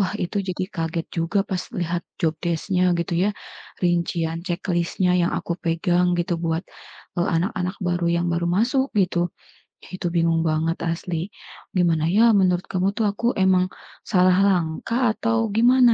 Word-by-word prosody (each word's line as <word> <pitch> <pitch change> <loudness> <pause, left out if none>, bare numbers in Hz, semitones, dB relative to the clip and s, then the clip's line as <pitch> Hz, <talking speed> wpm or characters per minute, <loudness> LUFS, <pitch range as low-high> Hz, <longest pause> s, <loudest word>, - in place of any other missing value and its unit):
Wah, 195 +1 0
itu 200 +1 -2
jadi 185 0 -2
kaget 165 -1 -2
juga 175 +4 0
pas 190 -2 -3 0.2
lihat 175 -3 -2 0.2
job 160 -1 +2
desc-nya 180 +1 +1
gitu 170 0 -2
ya. 195 +4 +2 0.5
Rincian 170 -1 0
ceklisnya 175 0 0
yang 170 -1 +1
aku 170 - -2
pegang 175 +1 +1
gitu 175 0 0
buat, 165 0 -1 0.6
eee, - - +1
anak-anak 180 +2 -1
baru 175 -1 0
yang 170 +1 +1
baru 170 0 0
masuk 245 +9 +2
gitu. 175 -3 +1 0.5
Itu 185 -1 -5
bingung 165 -1 +2
banget 160 +2 0
asli. 170 +2 -3 0.5
Gimana 165 -3 +2
ya 225 +4 +5
menurut 185 -1 +2
kamu 185 +1 0
tuh? 225 - +1
Aku 235 +4 0
emang 185 -1 +3 0.4
salah 185 -2 +4
langkah 200 +6 +1
atau 230 0 +1
gimana 245 +1 +6
180 Hz, 150 wpm, -23 LUFS, 170-195 Hz, 0.6 s, gimana